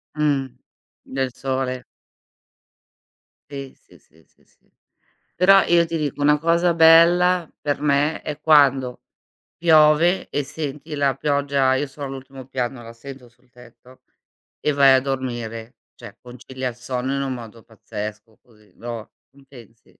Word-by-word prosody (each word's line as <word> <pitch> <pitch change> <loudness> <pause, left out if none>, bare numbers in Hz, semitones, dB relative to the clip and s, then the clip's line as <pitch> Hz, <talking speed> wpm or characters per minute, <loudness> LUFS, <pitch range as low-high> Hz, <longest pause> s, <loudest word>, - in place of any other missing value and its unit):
Mh. 145 -3 0 0.6
Del 130 -1 -3
sole. 130 -1 -3 1.7
Sì, 140 -1 -8
sì, - - -22
sì, 80 +1 -27
sì, - - -34
sì. - - -36 0.7
Però, 195 +2 +6
io 170 -1 +3
ti 165 0 -4
dico 145 -2 -3
una 150 0 +3
cosa 170 +1 +2
bella 170 +1 +5
per 145 -1 -2
me, 150 +1 +1
è 150 - -7
quando 135 -5 +3 0.6
piove 160 +2 +4
e 145 - -2
senti 150 0 -7
la 140 -2 0
pioggia 140 -2 +1
io 140 +2 -1
sono 140 +1 -8
all'ultimo 135 -1 -9
piano, 125 -2 -4
la 115 0 -11
sento 130 +1 -12
sul 125 +2 -29
tetto 125 +1 -19 0.6
e 150 - 0
vai 140 -1 +5
a 130 - +4
dormire: 120 -4 -5 0.2
cioè - - -12
concilia 125 +1 -7
il 120 - -10
sonno 125 +2 -4
in 140 - -2
un 135 -1 -3
modo 115 -2 -10
pazzesco 110 0 -9
così, 105 -5 -25
lo 115 -1 -8 0.2
non 140 0 -22
pensi? 120 -4 -17
135 Hz, 145 wpm, -21 LUFS, 125-150 Hz, 1.7 s, Però